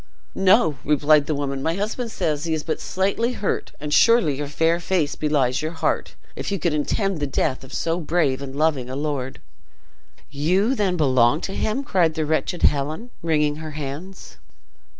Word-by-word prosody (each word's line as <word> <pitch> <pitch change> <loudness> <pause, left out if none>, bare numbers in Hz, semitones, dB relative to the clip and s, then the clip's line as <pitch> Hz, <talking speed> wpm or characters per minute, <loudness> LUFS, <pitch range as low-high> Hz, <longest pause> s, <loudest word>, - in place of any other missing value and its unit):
"No," 185 - +3
replied 150 0 +3
the 155 - 0
woman; 140 -1 -3
"my 165 +4 0
husband 220 +4 -3
says 150 -4 -1
he 160 -1 0
is 155 - -4
but 160 - -3
slightly 200 +6 0
hurt; 205 - -2
and 150 0 -4
surely 230 - +5
your 145 0 -3
fair 165 +4 +1
face 170 -4 0
belies 140 -4 +1
your 155 +2 -3
heart, 160 - -1 0.2
if - - -4
you 200 - 0
could 170 -2 0
intend 185 +5 -1
the 145 - -1
death 135 -1 -1
of 130 - -12
so 165 +1 -1
brave 155 -5 0
and 135 -1 -7
loving 145 -4 0
a 130 - -4
lord!" 140 -3 -3 0.9
"You 180 - +1
then 195 -7 0
belong 130 -2 +3
to 195 - -4
him?" 220 +8 -1
cried 175 - +1
the 155 - -1
wretched 160 +3 -1
Helen, 155 - +1
wringing 150 -2 +1
her 155 -1 -7
hands. 150 +7 -7
155 Hz, 180 wpm, -23 LUFS, 145-185 Hz, 0.9 s, surely